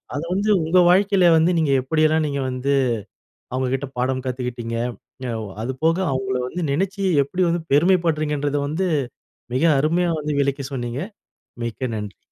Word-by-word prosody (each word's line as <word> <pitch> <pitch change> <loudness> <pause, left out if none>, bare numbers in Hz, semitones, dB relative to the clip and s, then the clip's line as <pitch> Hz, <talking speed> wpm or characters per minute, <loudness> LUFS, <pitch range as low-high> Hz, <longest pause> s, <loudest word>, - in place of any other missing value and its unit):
அத 145 - -2
வந்து 200 +3 0
உங்க 165 +3 +2
வாழ்க்கையில 190 0 +4
வந்து, 165 +3 +3
நீங்க 155 -3 +1
எப்படியெல்லாம் 155 +3 +2
நீங்க 140 -1 -2
வந்து 130 +2 -1 0.8
அவங்ககிட்ட 130 +2 -1
பாடம் 130 +1 0
கத்துக்கிட்டீங்க, 125 -2 -3 0.5
ய - - -3 0.3
அதுபோக 145 +7 0 0.2
அவங்கள 130 0 -1
வந்து 175 +8 -5
நெனைச்சு 195 +7 -1 0.2
எப்படி 180 +7 -2
வந்து 170 0 0
பெருமைப்படுறீங்கங்கறத 150 -3 +2
வந்து, 180 +5 -1 0.7
மிக 130 - +1 0.2
அருமையா 170 +4 +1
வந்து 150 0 -2
விளக்கி 140 0 -1
சொன்னீங்க. 120 +1 -3 0.6
மிக்க 120 +2 -3
நன்றி. 105 -2 -6
145 Hz, 135 wpm, -22 LUFS, 130-170 Hz, 0.8 s, வாழ்க்கையில